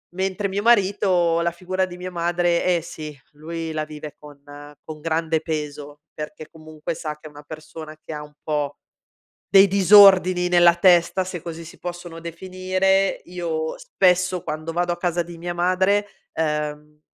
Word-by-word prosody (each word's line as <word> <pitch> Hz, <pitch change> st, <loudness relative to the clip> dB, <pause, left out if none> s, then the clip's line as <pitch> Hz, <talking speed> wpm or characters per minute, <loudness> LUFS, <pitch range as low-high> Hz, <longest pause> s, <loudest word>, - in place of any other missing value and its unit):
Mentre 190 Hz, +2 st, -1 dB
mio 195 Hz, +1 st, -2 dB
marito 190 Hz, -6 st, +3 dB
la 170 Hz, 0 st, 0 dB
figura 185 Hz, +2 st, -2 dB
di 180 Hz, -1 st, -10 dB
mia 180 Hz, +1 st, -6 dB
madre, 175 Hz, 0 st, 0 dB
eh 175 Hz, -2 st, +2 dB
sì, 155 Hz, -1 st, -8 dB, 0.2 s
lui 160 Hz, +2 st, -6 dB
la 155 Hz, 0 st, -2 dB
vive 150 Hz, -1 st, -9 dB
con 145 Hz, -1 st, -14 dB, 0.5 s
con 155 Hz, -1 st, -9 dB
grande 160 Hz, 0 st, 0 dB
peso, 150 Hz, -2 st, -5 dB
perché 155 Hz, +1 st, -8 dB
comunque 155 Hz, +1 st, -7 dB
sa 155 Hz, -1 st, -5 dB
che 155 Hz, -, -12 dB
è -, -, -11 dB
una 145 Hz, 0 st, -14 dB
persona 155 Hz, 0 st, -10 dB
che -, -, -8 dB
ha 150 Hz, 0 st, -6 dB
un 150 Hz, 0 st, -14 dB
po' 145 Hz, -2 st, -2 dB, 0.7 s
dei 195 Hz, 0 st, +7 dB
disordini 190 Hz, -2 st, +6 dB
nella 175 Hz, -1 st, +5 dB
testa, 175 Hz, +1 st, +4 dB
se 185 Hz, -1 st, -6 dB
così 165 Hz, -1 st, -7 dB
si 160 Hz, -, -13 dB
possono 175 Hz, -1 st, -7 dB
definire. 185 Hz, +3 st, 0 dB
Io 165 Hz, -3 st, -4 dB
spesso, 185 Hz, -, +1 dB
quando 155 Hz, +2 st, -4 dB
vado 175 Hz, +1 st, 0 dB
a -, -, -8 dB
casa 175 Hz, -1 st, -1 dB
di 170 Hz, 0 st, -11 dB
mia 175 Hz, +1 st, -4 dB
madre, 190 Hz, +4 st, +1 dB, 0.3 s
ehm, 150 Hz, -1 st, -3 dB
170 Hz, 165 wpm, -22 LUFS, 155-185 Hz, 0.7 s, dei